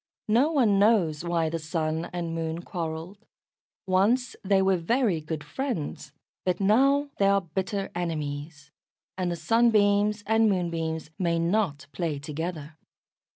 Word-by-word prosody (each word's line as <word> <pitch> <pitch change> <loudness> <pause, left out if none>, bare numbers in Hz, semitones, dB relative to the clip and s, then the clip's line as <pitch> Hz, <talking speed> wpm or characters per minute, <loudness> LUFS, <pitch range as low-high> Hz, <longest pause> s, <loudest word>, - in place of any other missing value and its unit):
No 250 +9 +4
one 230 -10 +3
knows 190 -8 +3
why 170 -2 0
the 165 +1 -3
Sun 160 0 -2
and 170 -2 -3
Moon 165 +1 -3
quarrelled. 170 +4 -5 0.6
Once 215 +7 +2
they 195 0 +3
were 190 0 +3
very 190 0 +1
good 155 0 -5
friends. 170 - -4 0.3
But 180 -1 0
now 275 +8 +3
they 195 - +4
are 200 0 +4
bitter 190 +3 -3
enemies, 150 -3 -4 0.4
and 180 -2 -1
the - - -1
Sunbeams 210 +2 +3
and 220 0 +3
Moonbeams 165 -4 -2
may 170 -2 +1
not 170 -4 0
play 165 -5 -2
together. 155 +1 -6
175 Hz, 135 wpm, -27 LUFS, 160-205 Hz, 0.6 s, No